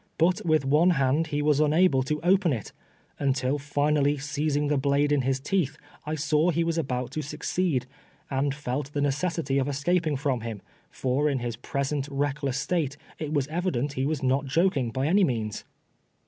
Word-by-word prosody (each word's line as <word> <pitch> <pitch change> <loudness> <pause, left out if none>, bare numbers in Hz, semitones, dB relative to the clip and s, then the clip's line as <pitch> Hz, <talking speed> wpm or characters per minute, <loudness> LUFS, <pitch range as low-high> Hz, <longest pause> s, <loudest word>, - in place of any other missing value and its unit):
Ihit 180 +3 +2
with 155 -4 +2
one 150 +6 +4
hand 140 +4 +2
he 145 -1 -1
was 150 -1 +3
unable 155 -1 +4
to 150 +4 -2
open 185 -1 +3
it, 115 -6 -4 0.5
until 135 0 0
finally 145 0 +1
seizing 145 +1 -1
the 150 - +1
blade 140 +1 +2
in 145 -2 +3
his 135 +1 0
teeth, 150 0 -1 0.3
I 155 - -1
saw 150 +2 +2
he 170 0 +1
was 165 0 0
about 125 -4 -2
to 155 - -3
succeed, 150 -1 -1 0.4
and 135 0 -1
felt 140 0 -4
the 145 - -1
necessity 145 0 0
of 135 - 0
escaping 155 +2 0
from 135 -4 -1
him, 110 -3 -6 0.3
for 135 +4 0
in 140 - 0
his 120 -2 -3
^^I'osent 140 +3 -2
reckless 140 -1 -1
state, 150 -5 -1 0.2
it 155 -2 -4
was 140 -3 0
evident 150 -5 -1
he 130 +1 -1
was 150 -2 -2
not 135 +2 +1
joking, 150 -4 +1
by 130 +4 -2
any 190 +6 +4
means. 110 - -2
145 Hz, 180 wpm, -26 LUFS, 135-155 Hz, 0.5 s, one